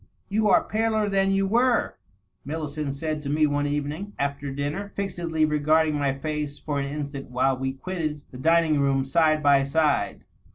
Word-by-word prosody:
" - - -43
You 215 -1 +3
are - - +5
paler 220 -1 0
than 195 -1 +2
you 195 0 +2
were,^^ 240 +4 +2 0.5
Millicent 150 -1 -4
said 155 +1 -3
to 140 - -5
me 155 +1 +3
one 145 0 0
evening, 150 +8 -3
B&er 140 0 -2
dinner, 145 +9 -4
fixedly 170 -5 -1
regarding 155 +1 +2
my 145 -2 +1
face 150 0 -3
for 145 -2 -3
an 140 - -2
instant 140 -1 -5
while 130 +2 +1
we 130 +1 -3
quitted 155 -1 -4
the 125 - -10
dining 165 0 +3
room 135 -1 +2
side 155 +2 +2
by 140 -1 +5
side. 140 -7 0
150 Hz, 175 wpm, -25 LUFS, 140-165 Hz, 0.5 s, are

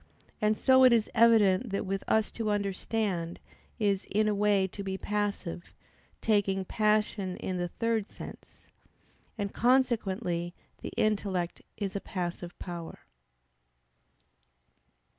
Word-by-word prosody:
And 215 0 +2
so 260 -1 +5
it 255 - +8
is 230 -2 +2
evident 225 -1 +5
that 195 +1 -2
with 195 0 -2
us 220 -1 +2
to 225 -2 -2
understand 200 -3 -1 0.4
is 200 -3 +1
"in 215 +2 +2
a 210 - +2
way 205 -1 +3
to 190 +2 -7
be 190 -1 -3
passive"; 205 -4 -3 0.5
taking 195 -3 +1
passion 210 -3 +1
in 185 - -3
the 175 0 -1
third 225 +2 -1
sense. - - -11 0.7
And 200 -2 -3
consequently 215 -8 +1 0.3
the - - -5
intellect 195 -5 0 0.2
is 200 -2 -3
a 200 - -2
passive 175 -2 -5
power. 170 -2 -7
200 Hz, 120 wpm, -29 LUFS, 185-215 Hz, 0.7 s, it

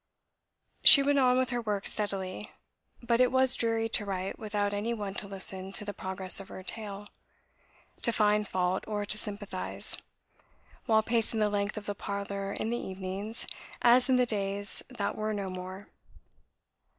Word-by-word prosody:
She 280 - +12
went 285 0 +2
on 250 -1 +4
with 260 0 0
her 240 -1 -1
work 205 -3 -3
steadily. 195 -1 +1 0.5
But 235 +1 +2
it 250 - +4
was 260 0 +4
dreary 225 -1 0
to 220 - +2
write 190 -1 -4
without 205 -2 -2
any 220 +4 -2
one 205 -3 -5
to 200 - -5
listen 190 -1 -3
to 210 - -4
the 205 - -5
progress 190 0 0
of 195 - -9
her 185 - -9
tale, 205 0 -7 1.0
to 235 - +2
find 210 -1 +2
fault 185 0 -1
or 205 -1 -3
to 210 - +3
sympathise, 205 -3 -4 0.9
while 220 -1 +4
pacing 225 -1 -1
the 210 -1 +2
length 205 +1 -2
of 210 - -6
the 205 - -3
parlour 200 0 -5
in 220 - -3
the 240 - -1
evenings, 190 +4 -5 0.4
as 245 +2 +5
in 260 - +4
the 250 0 +3
days 200 -2 -2
that 225 -6 -3
were 215 0 -2
no 200 -2 -4
more. 185 +2 -8
205 Hz, 170 wpm, -29 LUFS, 195-225 Hz, 1.0 s, She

